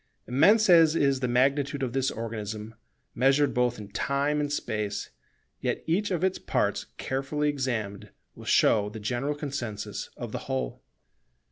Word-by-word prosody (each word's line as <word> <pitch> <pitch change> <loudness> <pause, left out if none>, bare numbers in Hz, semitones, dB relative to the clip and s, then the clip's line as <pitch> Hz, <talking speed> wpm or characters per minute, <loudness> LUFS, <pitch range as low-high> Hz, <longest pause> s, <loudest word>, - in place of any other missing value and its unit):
Immense 200 - +5
as 165 -3 +6
is 140 -4 +2
the 125 - 0
magnitude 140 +3 +1
of 125 -2 -2
this 135 0 +1
organism 110 -1 -5 0.4
measured 135 +4 +3
both 125 0 +1
in 105 -1 -9
Time 140 +6 0
and 145 -1 -1
Space, 105 -7 -3 0.5
yet - - -2
each 195 +6 +1
of 180 -2 -1
its 190 0 +1
parts - - -1
carefully 140 +3 -1
examined 120 -8 -3 0.2
will - - -12
show 105 -2 +4
the 110 +1 -8
general 125 +7 -1
consensus 130 -8 -5
of - - -6
the - - -3
whole. 65 -2 -2
135 Hz, 150 wpm, -27 LUFS, 110-145 Hz, 0.5 s, as